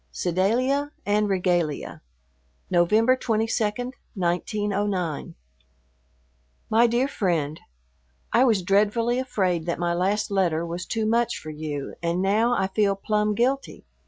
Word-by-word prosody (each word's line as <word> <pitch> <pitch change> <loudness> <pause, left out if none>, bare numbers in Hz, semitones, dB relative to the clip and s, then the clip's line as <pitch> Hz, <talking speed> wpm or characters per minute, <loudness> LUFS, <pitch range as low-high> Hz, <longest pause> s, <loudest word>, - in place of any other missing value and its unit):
V - - -42
SEDALIA 245 - 0
AND 210 0 +1
REGALIA 175 -5 -1 0.7
November 215 +8 +4
22, 225 -2 0 0.5
1909. 190 -2 -1 1.4
MY 230 +2 +5
DEAR 240 +3 +1
FRIEND, 165 - -1 0.7
I 240 - +5
was 220 -7 +3
dreadfully 215 +6 +2
afraid 185 -10 -1
that 170 - -1
my 175 0 0
last 195 +5 0
letter 170 -4 +1
was 170 +2 -5
too 225 -1 -1
much 235 +1 +1
for 155 - -8
you 150 -2 -5
and 170 +1 -1
now 215 +6 +2
I 190 - +1
feel 195 +1 +1
plumb 210 +1 0
guilty. 265 +5 -1
200 Hz, 125 wpm, -25 LUFS, 175-225 Hz, 1.4 s, MY